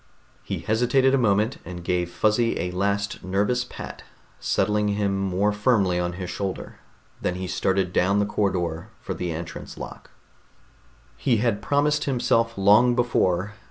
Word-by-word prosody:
He -, -, -4 dB
hesitated 125 Hz, +4 st, +2 dB
a -, -, +5 dB
moment, 110 Hz, +2 st, +2 dB
and 90 Hz, 0 st, -8 dB
gave 90 Hz, 0 st, 0 dB
Fuzzy 110 Hz, +5 st, +1 dB
a 90 Hz, -, -2 dB
last 100 Hz, +2 st, -1 dB
nervous 105 Hz, +6 st, +1 dB
pat, 125 Hz, -, -9 dB, 0.4 s
settling 105 Hz, 0 st, +1 dB
him 100 Hz, -1 st, 0 dB
more 95 Hz, +1 st, +1 dB
firmly 105 Hz, -4 st, +2 dB
on 90 Hz, 0 st, -1 dB
his 90 Hz, 0 st, -5 dB
shoulder. 95 Hz, +1 st, -5 dB, 0.4 s
Then 90 Hz, -, -1 dB
he 95 Hz, 0 st, -4 dB
started 95 Hz, 0 st, 0 dB
down 95 Hz, +3 st, +3 dB
the 105 Hz, -, +3 dB
corridor 90 Hz, -3 st, -1 dB
for -, -, -5 dB
the 90 Hz, -1 st, -3 dB
entrance 80 Hz, +1 st, -7 dB
lock. -, -, -9 dB, 1.1 s
He 120 Hz, -4 st, +2 dB
had 105 Hz, -2 st, 0 dB
promised 145 Hz, +5 st, +1 dB
himself 115 Hz, -4 st, +1 dB
long 105 Hz, +5 st, +5 dB
before 105 Hz, -5 st, +1 dB
100 Hz, 150 wpm, -24 LUFS, 90-115 Hz, 1.1 s, a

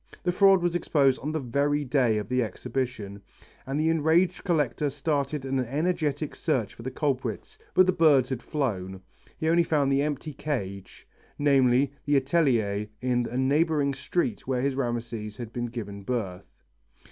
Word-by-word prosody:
The 180 Hz, -, +1 dB
fraud 195 Hz, -1 st, +5 dB
was 175 Hz, -1 st, +1 dB
exposed 140 Hz, -6 st, +2 dB
on 150 Hz, -, -3 dB
the 160 Hz, -, -1 dB
very 145 Hz, +3 st, 0 dB
day 125 Hz, -4 st, +2 dB
of 105 Hz, -, -3 dB
the 125 Hz, 0 st, +1 dB
exhibition, 110 Hz, -3 st, -4 dB, 0.5 s
and 135 Hz, +2 st, -1 dB
the 160 Hz, +1 st, +2 dB
enraged 165 Hz, +3 st, +2 dB
collector 150 Hz, -5 st, 0 dB
started 140 Hz, 0 st, -2 dB
an 135 Hz, 0 st, -1 dB
energetic 150 Hz, +3 st, -1 dB
search 110 Hz, -6 st, -1 dB
for -, -, -12 dB
the 125 Hz, -, -4 dB
culprits, 130 Hz, -6 st, -3 dB, 0.2 s
but 185 Hz, -, +7 dB
the 185 Hz, -, +3 dB
birds 155 Hz, -8 st, +4 dB
had 130 Hz, -3 st, -3 dB
flown 95 Hz, -, -3 dB, 0.4 s
he 160 Hz, -, -2 dB
only 170 Hz, +1 st, +4 dB
found 150 Hz, -4 st, +1 dB
the 135 Hz, 0 st, +3 dB
empty 150 Hz, +1 st, -3 dB
cage, 100 Hz, -10 st, -5 dB, 0.3 s
namely 135 Hz, -1 st, +3 dB
the 145 Hz, -, +2 dB
atelier 125 Hz, -8 st, +1 dB
in 125 Hz, -2 st, 0 dB
a 125 Hz, -, -4 dB
neighbouring 145 Hz, +1 st, +2 dB
street 175 Hz, -, -2 dB
where 130 Hz, -1 st, 0 dB
his 140 Hz, 0 st, +1 dB
Rameses 120 Hz, -4 st, -3 dB
had 120 Hz, -3 st, -7 dB
been 120 Hz, 0 st, -2 dB
given 105 Hz, -4 st, -6 dB
birth. 100 Hz, -5 st, -4 dB
135 Hz, 165 wpm, -27 LUFS, 120-150 Hz, 0.5 s, but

